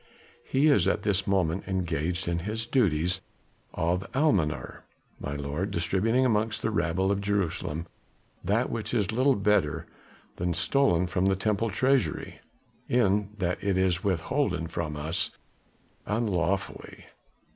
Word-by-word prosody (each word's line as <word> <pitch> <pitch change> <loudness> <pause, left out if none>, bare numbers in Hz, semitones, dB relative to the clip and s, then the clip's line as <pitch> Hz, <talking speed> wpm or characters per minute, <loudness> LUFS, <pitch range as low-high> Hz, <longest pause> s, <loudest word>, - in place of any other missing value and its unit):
"He 135 +3 +1
is 150 -2 +4
at - - +1
this 100 -2 0
moment 95 -2 0
engaged 85 -3 -1
in 85 0 0
his 110 +6 -3
duties 90 - +1 0.5
of 90 +3 0
almoner, 100 - 0 0.4
my 70 - -4
lord, 75 +7 -3
distributing 100 +8 +1
amongst 110 -2 0
the 115 - +1
rabble 95 -1 +1
of 100 0 0
Jerusalem 90 -5 -1 0.6
that 105 +7 +1
which 110 0 -3
is 105 -2 +1
little 130 +4 +3
better 100 -7 +1 0.5
than 90 -1 -1
stolen 90 - +3
from 90 +1 0
the 95 - +3
Temple 105 +3 0
treasury, 125 - 0 0.5
in 105 -4 +2
that 90 -2 -2
it 100 -2 +1
is 90 -2 +1
withholden 95 - 0
from 80 -3 -3
us 80 +3 -1 0.7
unlawfully. 100 -4 -2
95 Hz, 130 wpm, -27 LUFS, 85-110 Hz, 0.7 s, is